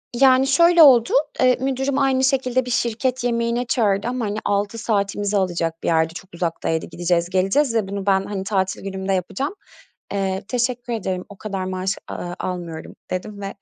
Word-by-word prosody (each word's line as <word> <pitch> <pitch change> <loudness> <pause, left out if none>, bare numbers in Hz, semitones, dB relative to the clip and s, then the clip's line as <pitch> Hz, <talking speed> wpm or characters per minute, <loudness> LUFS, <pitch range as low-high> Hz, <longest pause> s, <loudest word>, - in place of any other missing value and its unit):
Yani, 265 +1 +5
şöyle 335 +4 +6
oldu: 245 -5 +6 0.3
Eee, 255 -1 +4
müdürüm 265 +1 -1
aynı 265 -1 +2
şekilde 255 -1 +1
bir 250 - -4
şirket 240 +2 0
yemeğine 235 0 0
çağırdı 210 -3 +1
ama 245 -2 -2
hani 205 +1 -3
6 205 +2 0
saatimizi 205 -2 0
alacak 170 -3 -1
bir - - -2
yerdi, 160 0 +2
çok 185 +1 -11
uzaktaydı, 165 -1 -2
gideceğiz, 175 0 -1
geleceğiz 195 +8 +2
ve 215 -4 +1
bunu 200 0 -4
ben, 195 -1 +2
hani, 200 -2 -4
tatil 190 -1 -1
günümde 190 0 -3
yapacağım. 195 - -2 0.6
"Eee, 190 -1 -1
teşekkür 245 -1 -1
ederim, 185 -4 -3
o 200 - -12
kadar 195 -3 -4
maaş, 185 +2 -2
aaa, 175 0 -5
almıyorum." 175 -3 -5 0.2
dedim 200 +3 -4
ve 195 0 -5
205 Hz, 170 wpm, -21 LUFS, 190-250 Hz, 0.6 s, şöyle